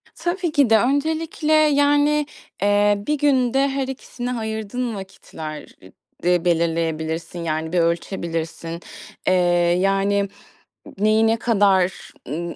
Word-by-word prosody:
Tabii 345 0 -2
ki 285 -5 +3
de. 225 - +6
Öncelikle, 310 +5 0
yani, 290 0 +3 0.4
eee, 205 0 +3
bir 300 0 +1
günde 270 -1 +2
her 270 -1 -2
ikisine 250 -1 -5
ayırdığın 220 +1 -3
vakitler 160 -5 -9
e 95 - -15 0.3
de 180 0 +2
belirleyebilirsin, 165 0 -1
yani, 160 +1 -3
bir 180 - +3
ölçebilirsin. 170 -1 -2 0.5
Eee, 185 - +4 0.5
yani, 195 +1 +1 0.7
n 200 - -4
neyi 220 +1 +4
ne 225 +1 +2
kadar, 195 -5 +1 0.2
ımm, 170 +4 -4
205 Hz, 120 wpm, -21 LUFS, 170-270 Hz, 0.7 s, de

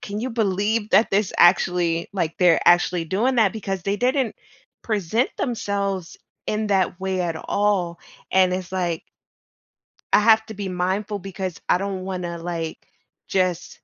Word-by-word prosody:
can 205 +1 -5
you 255 +1 -3
believe 210 0 0
that 220 - +4
this 200 -1 +1
actually, 175 -1 +3
like, 165 -3 -2
they're 175 -3 +5
actually 175 -1 +4
doing 225 +10 0
that 220 -5 +3
because 195 -4 -4
they 200 +2 -1
didn't 255 0 0 0.5
present 215 +3 0
themselves 200 -7 -2 0.3
in 215 0 -1
that 190 -2 +1
way 190 -1 -2
at 170 -2 -1
all," 185 -3 0 0.3
and 185 -1 +4
it's, 185 0 -5
like 175 -3 -2 1.1
I - - +7
have 220 0 +5
to 220 - -8
be 195 -1 -4
mindful 190 +3 -2
because 190 -2 -5
I - - +4
don't 195 -1 -3
wanna, 180 -2 -4
like, 165 -1 -4 0.5
just 185 -2 -1
190 Hz, 150 wpm, -23 LUFS, 180-210 Hz, 1.1 s, I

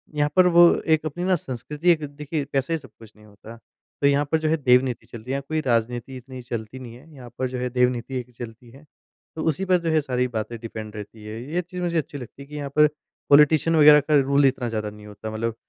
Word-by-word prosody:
यहाँ 145 0 +1
पर 185 -1 +6
वो 175 0 +9 0.2
एक 155 -1 +2
अपनी 175 +4 -4
ना 185 0 +3
संस्कृति 150 +3 -3
एक 155 -3 +1
देखिए 150 0 -3
पैसा 140 +4 0
ही 165 - 0
सब 130 -4 -15
कुछ 110 -2 -14
नहीं 105 - -19
होता। 105 +2 -13 0.4
तो 140 - +4
यहाँ 140 +1 +2
पर 160 - +4
जो 155 - -1
है, 160 - +2
देवनीति 125 -3 +2
चलती 115 +2 -11
है, - - 0
यहाँ 140 0 -2
कोई 155 0 -1
राजनीति 120 +1 -1
इतनी 130 0 -10
चलती 120 +1 -6
नहीं 120 -3 -9
है, 150 +5 -17
यहाँ 125 -3 -11
पर 130 - 0
जो 125 - -5
है 125 - -2
देवनीति 125 0 0
एक 125 0 -10
चलती 120 0 -9
है, 135 +4 -16 0.5
तो 160 - -4
उसी 160 +5 0
पर 185 -1 +4
जो 165 - -1
है 155 - +3
सारी 125 -3 -1
बातें 115 0 -4
डिपेंड 110 -2 -8
रहती 105 +1 -9
हैं। 110 +1 -7
ये 160 +7 -2
चीज़ 180 +1 -8
मुझे 170 -1 -1
अच्छी 150 -2 -3
लगती 125 +1 -11
है 140 - -11
कि 150 - -10
यहाँ 145 -1 -4
पर 150 0 +6 0.4
पॉलिटिशियन 150 +3 +5
वगैरह 150 -1 +8
का 150 - +4
रूल 140 +1 +3
इतना 130 -2 +1
ज़्यादा 110 -2 -3
नहीं 105 0 -13
होता। 105 +1 -8
मतलब 110 +1 -3
130 Hz, 255 wpm, -23 LUFS, 120-150 Hz, 0.5 s, वो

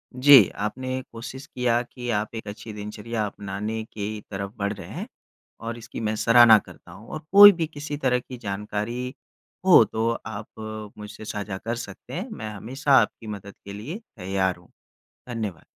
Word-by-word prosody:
जी, 130 -5 +8
आपने 130 +5 -3
कोशिश 125 +4 -8
किया 120 -1 +1
कि 125 0 -8
आप 105 0 -1
एक 110 -1 -6
अच्छी 105 +2 -7
दिनचर्या 105 +2 -4
अपनाने 105 +2 -4
की 105 0 -4
तरफ़ 100 0 -4
बढ़ 100 -1 -1
रहे - - -10
हैं - - -5 0.5
और 115 0 -4
इसकी 120 0 -8
मैं 110 -1 -1
सराहना 115 0 +7
करता 90 - -15
हूँ। 100 +6 -13
और 155 - -5
कोई 205 +1 +11
भी 170 -4 -2
किसी 145 -1 -6
तरह 130 -3 +2
की 125 +1 -10
जानकारी 105 +4 -4 0.5
हो 180 -10 +9
तो 110 +2 -1 0.2
आप 110 0 -7
मुझसे 105 +1 -9
साझा 105 -2 -4
कर 115 +4 -3
सकते 120 +1 -9
हैं। 185 - -3
मैं 110 - -6
हमेशा 130 +7 -3
आपकी 110 - -4
मदद 100 -1 -7
के 100 - -7
लिए 120 - -6 0.2
तैयार 95 0 0
हूँ। 85 0 -21 0.6
धन्यवाद। 110 -9 -4
110 Hz, 170 wpm, -25 LUFS, 105-125 Hz, 0.6 s, कोई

